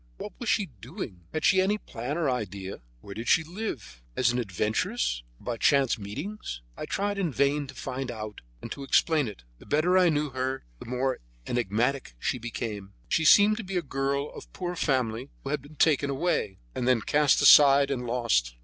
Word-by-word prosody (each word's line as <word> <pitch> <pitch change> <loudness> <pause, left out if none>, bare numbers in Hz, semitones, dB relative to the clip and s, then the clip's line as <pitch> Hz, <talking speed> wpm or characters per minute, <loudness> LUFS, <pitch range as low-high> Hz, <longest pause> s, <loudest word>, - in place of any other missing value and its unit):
What 210 - -6
was 240 - -3
she 205 - +2
doing? 120 - -9
Had 155 - -2
she 190 0 +5
any 200 +3 +1
plan 130 - -5
or 165 -4 +1
idea? 100 - -3 0.2
Where 100 - -9
did 115 +3 -6
she 165 - +4
live? 165 - -6
As 125 -1 +3
an 120 - -1
adventuress, 110 - -1 0.2
or - - -19
by 120 -2 -2
chance 135 -2 +3
meetings? 105 - -6
I - - -5
tried 200 0 -1
in 175 -5 0
vain 140 +1 +1
to 135 - -11
find 130 +1 -4
out 110 -3 -6 0.2
and - - -7
to 140 - -6
explain 150 +1 +3
it. 100 - -9 0.2
The - - -16
better 175 +5 +3
I 180 -2 +5
knew 150 -2 0
her 130 +1 -3
the - - -9
more 130 +1 -1 0.3
enigmatical 120 - -1
she 125 - -2
became. 110 -4 -5 0.2
She 160 - +2
seemed 210 +5 +7
to 230 - -4
be 190 -1 -3
a 175 - 0
girl 140 +1 -2
of - - -11
poor 180 -1 -4
family 130 -5 0
who 135 - -4
had 150 -2 -1
been 145 +3 -15
taken 145 -2 +3
away, 135 - -1 0.2
and 125 - -2
then 125 -3 +3
cast 145 +4 +3
aside 140 -1 +7
and 125 -3 -2
lost. 115 - +1
135 Hz, 200 wpm, -27 LUFS, 115-155 Hz, 0.3 s, seemed